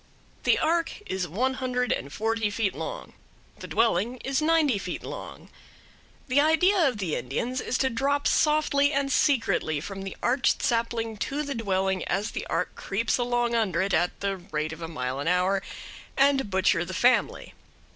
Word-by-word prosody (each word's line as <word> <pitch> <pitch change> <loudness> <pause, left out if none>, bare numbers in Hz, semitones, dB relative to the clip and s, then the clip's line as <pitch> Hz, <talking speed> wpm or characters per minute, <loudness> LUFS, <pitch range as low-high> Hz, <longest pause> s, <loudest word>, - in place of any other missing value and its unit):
The - - +4
ark 335 +1 0
is 185 -1 -2
one 250 - 0
hundred 250 -1 0
and 140 - -2
forty 225 +2 -1
feet 205 -1 -1
long; - - -6 0.5
the - - -8
dwelling 230 +2 +1
is 270 +2 0
ninety 305 -8 +3
feet 180 -2 -5
long. - - -8 0.8
The 270 +2 +4
idea 320 +3 +4
of 250 - -1
the 185 -6 -2
Indians 230 - -2
is 255 - -1
to 265 - +1
drop 280 +4 0
softly 300 -2 +3
and 275 -1 0
secretly 230 - +1
from 195 +5 -7
the 195 -1 -7
arched 245 0 +2
sapling 230 -1 -1
to 285 +8 -2
the 285 -1 -3
dwelling 190 -4 0
as 200 +4 -1
the - - -5
ark - - -1
creeps 220 +5 -1
along 240 -1 0
under 215 -7 +1
it 190 +1 0
at 175 +2 0
the 200 -1 -1
rate 155 -4 -4
of 160 - -10
a 165 - -4
mile 130 -4 -4
an 145 - -3
hour, 180 +2 +2 0.6
and 275 -4 +3
butcher 190 -2 +2
the 180 +1 -6
family. 250 +5 +2
230 Hz, 175 wpm, -26 LUFS, 190-270 Hz, 0.8 s, The